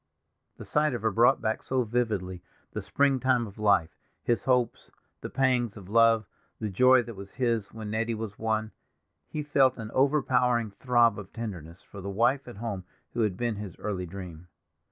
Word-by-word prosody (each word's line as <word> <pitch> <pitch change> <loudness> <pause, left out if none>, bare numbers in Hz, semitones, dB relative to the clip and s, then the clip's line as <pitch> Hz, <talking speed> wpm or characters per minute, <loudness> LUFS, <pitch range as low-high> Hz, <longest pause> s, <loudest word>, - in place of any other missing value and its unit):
The - - -9
sight 150 -3 +1
of 115 - -5
her 110 - +2
brought 115 +4 +4
back 110 0 0
so 130 -1 0
vividly 105 -6 -2 0.3
the - - -3
springtime 130 -3 +2
of 105 -1 -12
life; 100 -6 +2 0.2
his 120 -2 0
hopes, 125 -3 +1 0.3
the - - -5
pangs 125 -5 +1
of 95 -2 -11
love, 115 0 +4 0.3
the 110 - -2
joy 125 +5 +5
that 115 -1 -9
was 100 0 -10
his 115 -5 0
when 110 -2 -6
Nettie 115 +1 -1
was 110 -2 -6
won; 110 0 -1 0.6
he 150 - -4
felt 135 -3 +3
an 110 -2 -7
overpowering 125 -5 +2
throb 120 0 +3
of 100 -2 -10
tenderness 95 -7 -7
for 100 - -11
the 100 - -5
wife 120 +7 +1
at 120 - -9
home 105 -4 -4 0.3
who 120 - -1
had 105 -4 0
been 120 -2 -1
his 100 -4 -7
early 95 -4 -3
dream. 90 -2 -9
115 Hz, 180 wpm, -28 LUFS, 100-125 Hz, 0.6 s, joy